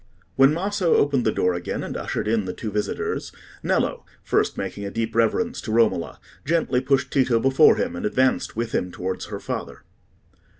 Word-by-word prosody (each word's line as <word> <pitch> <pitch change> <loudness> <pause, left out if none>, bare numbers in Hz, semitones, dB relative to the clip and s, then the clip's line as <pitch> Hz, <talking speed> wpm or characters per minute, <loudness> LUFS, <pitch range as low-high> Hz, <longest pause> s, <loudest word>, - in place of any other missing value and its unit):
When 135 +1 +6
Maso 185 +1 +1
opened 140 -5 +2
the - - +3
door 90 -3 +1
again, 85 0 -4
and - - -5
ushered - - -3
in 110 -2 +1
the 90 - -4
two 110 - -5
visitors, 105 +1 -2 0.3
Nello, - - 0 0.2
first - - +1
making 100 - -4
a 100 - -3
deep 115 +2 -3
reverence 225 - +1
to 110 - -5
Romola, 110 -6 +1 0.2
gently 145 -5 +1
pushed 135 +1 +1
Tito 125 -4 +3
before 135 +5 +5
him, 250 +1 -2
and 255 - -5
advanced 130 -11 +1
with 115 +1 -2
him 90 -5 -1
towards 95 +1 -4
her - - -6
father. - - -6
120 Hz, 180 wpm, -23 LUFS, 105-145 Hz, 0.3 s, When